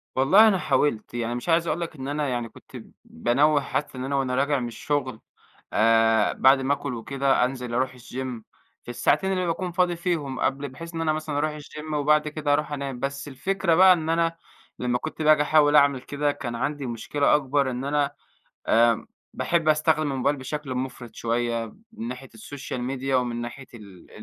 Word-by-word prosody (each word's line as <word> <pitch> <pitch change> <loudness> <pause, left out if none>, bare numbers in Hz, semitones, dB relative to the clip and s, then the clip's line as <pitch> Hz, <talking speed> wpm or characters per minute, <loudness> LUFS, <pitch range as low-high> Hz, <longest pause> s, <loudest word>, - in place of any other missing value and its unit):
والله 185 +12 +6
أنا 200 -3 +3
حاولت، 130 -11 0
يعني 120 0 -2
مش 120 +8 -5
عايز 165 +1 +3
اقول 170 - -1
لك 165 - -5
إن 135 -2 -6
أنا 145 +1 -1
يعني 120 -2 -3
كنت - - -18 0.3
بانوّه 145 - +2
حتى 140 0 -3
إن 130 - -4
أنا 140 - -2
وأنا 130 -2 0
راجع 140 +1 +1
من 120 - -3
الشغل 130 0 -3 0.5
آآ، 115 -1 +4
بَعد 135 +1 +5
ما 135 +2 +1
آكُل 140 -2 -4
وكده، 135 +2 +1
أنزِل 125 -2 -5
أرُوح 130 +1 0
الgym 125 -1 -6 0.4
في - - -12
الساعتين 190 +10 +1
اللي 185 -1 0
باكُون 175 +2 -2
فاضي 175 0 +1
فيهم 165 -7 -2
قبْل 140 +1 -1
بحيث 165 +6 -10
إن 165 - -2
أنا 155 -1 +1
مثلًا 155 -2 -3
أرُوح 150 +1 -1
الgym 150 +1 -8
وبعد 150 +1 +2
كده 150 -1 -1
أرُوح 150 +1 0
أنام، 140 -3 -4
بس 140 +2 -4
الفكرة 170 +5 0
بقى 185 +1 +8
إن 160 -2 -3
أنا 165 0 +1 0.4
لما 125 0 0
كنت 155 +4 -6
باجي 155 -1 +5
أحاول 150 0 +4
أعمِل 140 -3 +5
كده، 145 +2 -1
كان 120 -4 -5
عندي 145 +3 -3
مشكلة 125 +4 +1
أكبر 140 -1 +1
إن 125 +2 -4
أنا 145 0 +1 0.6
آمم 115 0 +3 0.3
باحب 165 -2 0
أستخدم 155 -1 +2
الموبايل 135 +2 0
بشكْل 135 0 -5
مُفرِط 125 -3 -5
شوية 115 0 -1 0.3
من 115 - -6
ناحية 125 +2 -7
السوشيال 130 +2 -7
ميديا 135 +1 -1
ومن 120 -2 -1
ناحية 120 +3 -7
ال 100 -5 -13
140 Hz, 190 wpm, -25 LUFS, 125-150 Hz, 0.6 s, بقى